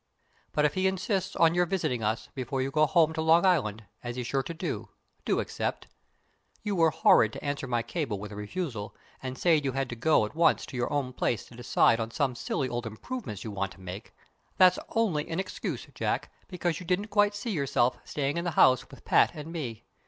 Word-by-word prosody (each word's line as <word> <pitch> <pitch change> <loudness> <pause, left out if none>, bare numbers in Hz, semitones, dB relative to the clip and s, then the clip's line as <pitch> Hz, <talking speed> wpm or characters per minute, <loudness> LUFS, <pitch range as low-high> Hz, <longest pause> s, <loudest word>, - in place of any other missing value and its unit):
But 150 - +2
if 150 - +2
he 185 +3 +2
insists 190 0 -1
on 165 0 +4
your 175 0 +2
visiting 165 -10 -1
us, 110 0 -1
before 130 +1 -3
you 135 +1 -1
go 155 +1 +4
home 160 0 +4
to 160 - -2
Long 165 +3 +5
Island, 115 - +2 0.2
as 120 -1 -5
he's 125 -1 -3
sure 135 +3 0
to, 160 +5 -4 0.4
do - - +1
accept. - - -3 0.8
You 210 -2 -1
were 165 -2 +5
horrid 110 -7 +4
to - - -8
answer 145 -1 -2
my 120 -2 0
cable 120 - -3
with 105 +1 -7
a - - -7
refusal, 105 - -4 0.3
and 130 -1 -5
say 165 -1 +3
you 135 -2 -1
had 135 -1 -1
to 120 - -4
go 125 -1 +3
at 105 - -8
once 165 +1 +3
to - - -10
your 120 -1 -1
own 140 -3 -1
place 120 -3 -1
to 120 - -14
decide 120 -1 +3
on 115 0 -2
some 135 +2 0
silly 130 +2 -2
old 120 -1 -3
improvements 110 - -6
you 110 - -5
want 100 -1 -3
to - - -19
make. 95 +4 -8 0.5
That's 185 -1 +6
only 185 -10 0
an 165 +2 -2
excuse, 190 - -4
Jack, - - -2 0.2
because 175 -3 -2
you 180 - -9
didn't 195 +4 0
quite 205 0 +3
see 215 +3 -3
yourself 135 -7 +1
staying 145 +1 -2
in 170 - -1
the 175 - 0
house 130 -1 +5
with - - -15
Pat - - +5
and 155 +1 -7
me. 120 -10 -5
140 Hz, 220 wpm, -28 LUFS, 120-175 Hz, 0.8 s, That's